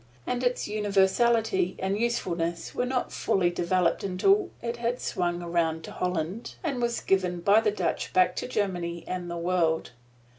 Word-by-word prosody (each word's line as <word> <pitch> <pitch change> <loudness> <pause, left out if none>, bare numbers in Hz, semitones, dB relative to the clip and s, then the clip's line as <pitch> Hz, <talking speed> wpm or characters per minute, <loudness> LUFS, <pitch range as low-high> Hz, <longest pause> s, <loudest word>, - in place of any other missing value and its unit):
And 250 0 -2
its 245 0 0
universality 205 -1 +2
and 190 +1 -1
usefulness 175 -7 -1
were 250 - -1
not 250 -1 -1
fully 175 -2 +1
developed 175 0 +1
until 360 - +2
it 235 0 -4
had 235 +1 -1
swung 175 -1 -2
around 165 -2 0
to - - -8
Holland 180 +4 -3
and 275 -7 -1
was 235 0 0
given 180 -2 +1
by 205 +5 +5
the 220 - +2
Dutch 210 - -2
back 180 -1 +3
to - - -2
Germany 175 -7 -2
and 180 -1 -4
the 170 - -4
world. 170 -3 0
190 Hz, 160 wpm, -27 LUFS, 175-235 Hz, -, by